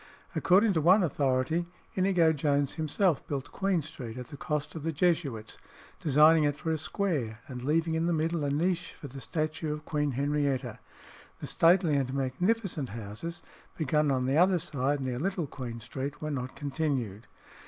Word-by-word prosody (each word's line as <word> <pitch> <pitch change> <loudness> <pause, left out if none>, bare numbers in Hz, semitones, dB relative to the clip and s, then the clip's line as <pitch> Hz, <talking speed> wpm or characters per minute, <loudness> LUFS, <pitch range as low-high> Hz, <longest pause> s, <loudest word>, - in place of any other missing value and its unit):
According 195 +3 +4
to 160 - +1
one 185 +6 +6
authority 140 +2 +1 0.3
Inigo 180 -4 +3
Jones 145 -2 +1
himself 160 +1 +1
built 140 -2 -4
Queen 190 -5 0
Street, 130 -6 -8
at 125 - -7
the 150 - -8
cost 145 +1 -3
of 160 - -6
the 165 +2 -1
Jesuits, 145 - 0 0.4
designing 155 +2 +5
it 145 -1 +1
for 160 +2 -2
a 160 - +1
square, 150 - -2
and 125 -2 -6
leaving 160 +5 +1
in 165 +1 +1
the - - +2
middle 165 0 0
a 145 - 0
niche 170 +4 0
for 145 - -7
the 135 +1 -9
statue 155 +1 -2
of 150 0 -5
Queen 150 -2 0
Henrietta. 140 -3 -1 0.6
"The - - -7
stately 170 -2 +4
and 130 -2 0
magnificent 160 - 0
houses," 110 +10 -6 0.3
begun 150 -1 +2
on 130 -2 +1
the 135 +3 +2
other 180 +2 +5
side 145 -4 -1
near 125 -2 -2
Little 185 0 -1
Queen 125 -4 -6
Street, 135 +5 -5
were 155 0 -3
not 130 -2 -4
continued. 135 -7 -2
150 Hz, 175 wpm, -29 LUFS, 135-165 Hz, 0.6 s, one